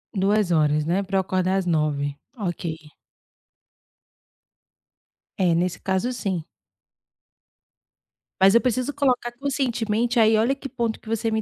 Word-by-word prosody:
2h, 175 -7 +2
né, 175 +5 +1
pra 195 0 -1
eu - - +4
acordar 185 0 0
às 190 - -1
9h. 150 -4 0 0.2
Ok. 175 -5 -3 2.6
É, 180 -3 +2
nesse 175 +1 -1
caso, 190 +6 -1
sim. 190 -9 -3 2.0
Mas 195 +3 +6
eu 235 - +6
preciso 255 +3 -1
colocar 255 -4 +1
conscientemente. 240 -3 -1
Aí, 220 -1 +5
olha 235 +5 +2
que 275 - -7
ponto 235 -4 -2
que - - -21
você 225 0 -1
me 220 - 0
205 Hz, 125 wpm, -24 LUFS, 180-240 Hz, 2.6 s, Mas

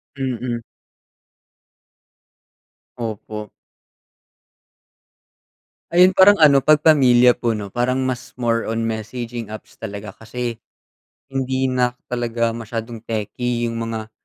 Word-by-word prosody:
Mm. 125 -3 -3 2.4
Opo. 110 -2 -6 2.4
Ayun 180 +2 +6
parang 190 +2 +7
ano 150 -6 +6
'pag 150 +2 +4
pamilya 125 -5 +6
po 120 -2 -1
'no, 100 -2 -6
parang 125 +3 0
mas 130 -1 -4
more 115 -2 0
on 115 +1 -1
messaging 115 +1 -4
apps 110 0 -11
talaga 100 0 -6
kasi 115 +2 -5 0.7
hindi 130 0 -1
na 125 -1 +1 0.2
talaga 120 -1 0
masyadong 115 0 -5
techy 115 +2 -2
'yung 115 -1 -2
mga 115 -1 -4
120 Hz, 100 wpm, -21 LUFS, 115-130 Hz, 2.4 s, parang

